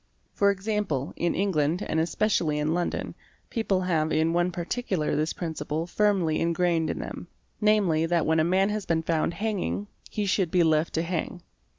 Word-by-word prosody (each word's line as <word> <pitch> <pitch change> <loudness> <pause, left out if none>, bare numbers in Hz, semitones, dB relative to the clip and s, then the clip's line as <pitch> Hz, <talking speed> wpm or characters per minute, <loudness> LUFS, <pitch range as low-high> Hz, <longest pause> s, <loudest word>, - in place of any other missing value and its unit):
For 200 - +3
example, 200 -8 -1
in 170 - 0
England, 175 -3 +1
and 160 - 0
especially 165 -2 +1
in 150 +2 0
London, 175 0 -2 0.4
people 200 -5 0
have 160 -4 0
in 160 +1 +2
one 175 +1 +2
particular 180 -1 -2
this 155 +1 0
principle 160 -1 -3
firmly 185 -4 +1
engrained 170 -1 +1
in - - -2
them; - - -6 0.3
namely 195 -7 +3
that 170 -1 +1
when 160 0 +2
a - - +4
man 190 +4 +2
has 210 -2 -3
been 160 -1 +1
found 165 +1 0
hanging, 205 -1 -2 0.2
he 210 - -2
should 190 -3 +1
be 175 +1 +3
left 160 0 +2
to 165 - +1
hang. 175 0 -3
170 Hz, 175 wpm, -26 LUFS, 160-195 Hz, 0.4 s, a